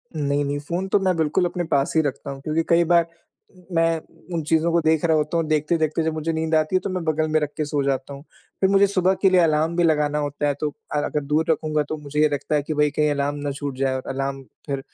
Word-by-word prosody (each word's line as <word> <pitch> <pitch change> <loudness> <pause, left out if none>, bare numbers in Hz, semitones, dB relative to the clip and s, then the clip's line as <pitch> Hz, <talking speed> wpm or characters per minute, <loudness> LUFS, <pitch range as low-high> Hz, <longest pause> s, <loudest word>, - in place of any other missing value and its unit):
नहीं, 145 -1 0
नहीं 145 +1 -2
फ़ोन 175 +6 -3
तो 200 - +3
मैं 185 -1 +1
बिल्कुल 160 +3 +1
अपने 175 0 -2
पास 140 -2 +1
ही 160 - +5
रखता 140 -1 -4
हूँ 135 - -8
क्योंकि 155 +3 -1
कई 170 0 +5
बार 170 -1 +5 0.4
उम, 185 -2 -21
मैं 165 0 +2 0.4
उन 160 - -1
चीज़ों 160 +2 +2
को 170 0 +2
देख 160 -1 +2
रहा 160 -1 +3
होता 150 +3 0
हूँ, 165 - 0
देखते-देखते 155 +1 +1
जब 160 0 -1
मुझे 155 +1 -2
नींद 160 0 0
आती 155 +3 +1
है 185 - +5
तो 200 - -5
मैं 185 -2 -3
बगल 155 -1 0
में 155 - +3
रख 150 -1 -2
के 155 - -1
सो 145 -1 -1
जाता 135 0 -2
हूँ। 140 +1 -10 0.4
फिर 190 - +4
मुझे 200 0 +5
सुबह 190 -1 +2
के 195 - +5
लिए 185 - +4
अलार्म 160 0 +2
भी 175 - +2
लगाना 150 -2 +2
होता 145 0 -2
है, 145 - +1
तो 150 +2 -3 0.2
अ, - - +1
अगर 150 - -2
दूर 150 +3 +1
रखूँगा 155 -1 0
तो 155 - -3
मुझे 150 0 -5
ये 155 - +4
लगता 145 +2 -1
है 145 - +2
कि 155 - -3
भई 150 0 +2
कहीं 150 +1 +1
अलार्म 145 0 -1
ना 145 - -1
छूट 140 -1 -5
जाए 135 0 0
और 130 - -4
अलार्म 135 0 -3 0.2
फिर 140 -2 -2
155 Hz, 275 wpm, -23 LUFS, 145-165 Hz, 0.4 s, ही